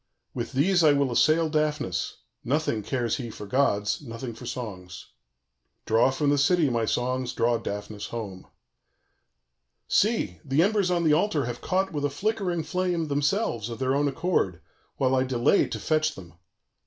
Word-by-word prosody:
With - - -4
these 175 +6 +3
I 150 -2 +6
will 140 -2 +1
assail 155 +6 +3
Daphnis: 150 - -1 0.3
nothing 140 -4 0
cares 120 +2 -1
he 120 -4 -5
for 105 - -8
gods, 105 -2 +1
nothing 115 -2 -6
for 115 - -10
songs. 90 -7 -7 0.8
"Draw 115 +3 +4
from 140 +2 +1
the 145 - +2
city, 150 0 +3
my 115 -1 0
songs, 125 +2 -1
draw 115 0 +1
Daphnis 105 -1 -5
home. 100 -6 -7 1.4
"See! 200 - +1
the 140 +4 +2
embers 200 -2 +2
on 175 -1 +1
the 155 -2 +4
altar 155 - +1
have 120 0 -5
caught 190 -1 0
with 145 -1 -2
a 145 - +2
flickering 180 +1 -1
flame, 175 -1 -1
themselves, 145 - 0
of 115 - -6
their 130 +2 0
own 145 +1 +2
accord, 135 - 0 0.4
while 130 -1 +2
I 130 - +3
delay 130 +7 +2
to - - -5
fetch 155 0 +1
them. 85 -3 -12
135 Hz, 165 wpm, -26 LUFS, 115-160 Hz, 1.4 s, I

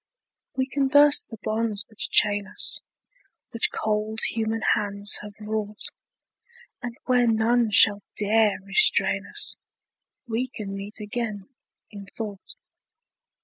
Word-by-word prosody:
We 260 - 0
can 275 0 0
burst 290 +1 +5
the 225 - -9
bonds 215 -1 -2
which 215 - -3
chain 205 -1 +4
us, 190 - -3 0.7
Which 230 -2 +2
cold 215 0 -2
human 225 0 -2
hands 205 0 0
have 210 -1 -11
wrought, 215 0 -5 0.9
And 240 0 -6
where 250 -2 +3
none 230 +1 +2
shall 205 0 +5 0.2
dare 215 0 +2
restrain 200 - +3
us - - -1 0.7
We 235 +3 -2
can 210 -5 -7
meet 200 +3 -7
again, 210 -1 -5 0.4
in 200 -2 -10
thought. 205 - -8
220 Hz, 120 wpm, -24 LUFS, 205-230 Hz, 0.9 s, burst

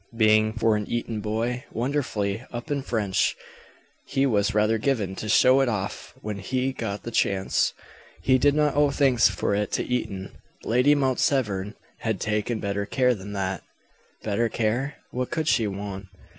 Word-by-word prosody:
Being, 110 -1 +4
for 115 -1 +2
an 105 -1 -2
Eton 115 -2 -2
boy, 115 +4 -2
wonderfully 115 -5 -1
up 120 +5 -6
in 140 -1 0
French, 105 -7 0 0.7
he 135 0 +1
was 105 -4 +1
rather 105 +1 +3
given 105 -7 0
to 110 - -5
show 130 +4 +6
it 135 - +2
off 100 -3 -4
when 105 -1 -4
he 130 +7 -1
got 105 -5 -4
the 115 - -5
chance. 95 -4 +1 0.5
He 130 -1 +4
did 145 +2 +4
not 150 -1 +2
owe 145 0 +4
thanks 135 -4 +4
for 100 +1 -1
it 105 0 -1
to - - +1
Eton. 100 -6 -3 0.3
Lady 125 +6 +4
Mount 130 -3 +1
Severn 105 -6 0 0.2
had 110 -4 -2
taken 110 +1 -1
better 100 0 -2
care 125 +3 +2
than 100 -2 -8
that. 95 -2 -2 0.6
Better 110 +2 0
care? 120 +7 -1 0.2
What 125 0 -2
could 160 -2 -2
she 115 -7 +3
want? 100 -1 -6
110 Hz, 170 wpm, -25 LUFS, 100-130 Hz, 0.7 s, show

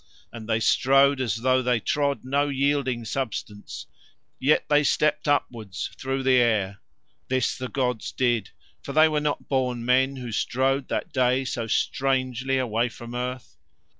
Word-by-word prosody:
And 115 -1 -9
they 110 0 +2
strode 135 +3 +3
as 115 -6 0
though 130 0 +3
they 125 -2 +1
trod 140 +3 -1
no 140 +2 +1
yielding 135 -3 0
substance, 110 -4 -5 0.5
yet 140 +4 +2
they 150 0 +4
stepped 150 +1 +1
upwards 115 -8 -1
through 135 0 -3
the 130 -1 +4
air. 105 -5 +1 0.5
This 130 0 0
the 130 - -5
gods 125 -4 -2
did, 120 -5 0 0.3
for 140 - -7
They 155 +2 +6
were 155 -1 0
not 150 -1 -2
born 125 -3 -1
men 130 +2 +3
who 125 -3 -6
strode 130 +4 0
that - - -3
day 130 +1 +2
so 120 -3 -3
strangely 130 +1 0
away 120 -1 0
from 120 +1 -10
earth. 125 +1 -5
130 Hz, 155 wpm, -25 LUFS, 120-135 Hz, 0.5 s, They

